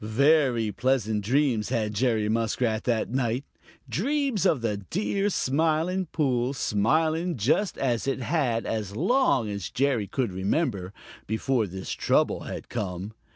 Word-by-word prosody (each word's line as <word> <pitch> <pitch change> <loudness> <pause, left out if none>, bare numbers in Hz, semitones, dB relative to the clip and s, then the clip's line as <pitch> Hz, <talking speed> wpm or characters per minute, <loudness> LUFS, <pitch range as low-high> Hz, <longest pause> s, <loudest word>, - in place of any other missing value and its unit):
Very 125 -1 +3
pleasant 110 -4 0
dreams 125 -2 +1
had 110 -4 -1
Jerry 110 -1 +1
Muskrat 110 0 0
that 115 -2 0
night, 125 +1 -1 0.4
dreams 245 - 0
of 135 - +2
the 110 -3 -1
dear 195 - -1
Smiling 165 +4 0
Pool, 130 -4 0
smiling 155 - +1
just 145 - +1
as 125 -2 0
it 135 - 0
had 125 -4 0
as 105 -3 -3
long 185 - +2
as 100 -6 -4
Jerry 125 -6 0
could 125 -3 -1
remember, 100 - -1 0.4
before 110 +1 0
this 95 +1 -6
trouble - - +1
had - - -6
come. 100 -2 -4
125 Hz, 135 wpm, -26 LUFS, 110-155 Hz, 0.4 s, Very